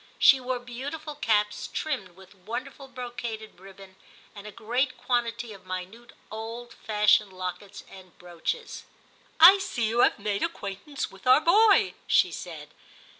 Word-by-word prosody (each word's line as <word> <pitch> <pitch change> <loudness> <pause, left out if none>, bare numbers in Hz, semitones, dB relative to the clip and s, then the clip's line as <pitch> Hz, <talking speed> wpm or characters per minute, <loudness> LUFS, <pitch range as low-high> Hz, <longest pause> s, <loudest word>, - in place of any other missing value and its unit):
She 270 - +6
wore 255 0 -2
beau 245 +2 -7
tiful 310 0 -7
caps, 210 -7 0
trimmed 195 - -4
with 190 +1 -17
wonderful 235 +8 -7
brocaded 240 -5 -7
ribbon, 195 0 -14 0.4
and 205 0 -10
a - - -8
great 245 +5 -1
quantity 235 -2 -2
of 190 -2 -15
minute 185 +6 -7 0.2
old 230 +2 -7
fashioned 210 -1 +2
lockets 185 +2 -7
and 185 -2 -15
brooches. 180 - -5 0.3
* - - -33
I 370 +5 +10
see 240 -12 -2
you 230 +2 -1
have - - +4
made 205 -1 -2
acquaintance 275 - -4
with 195 +4 -12
our 255 +4 +7
boy,' 405 +3 +5
she - - +4
said. - - -8
225 Hz, 150 wpm, -27 LUFS, 195-255 Hz, 0.4 s, I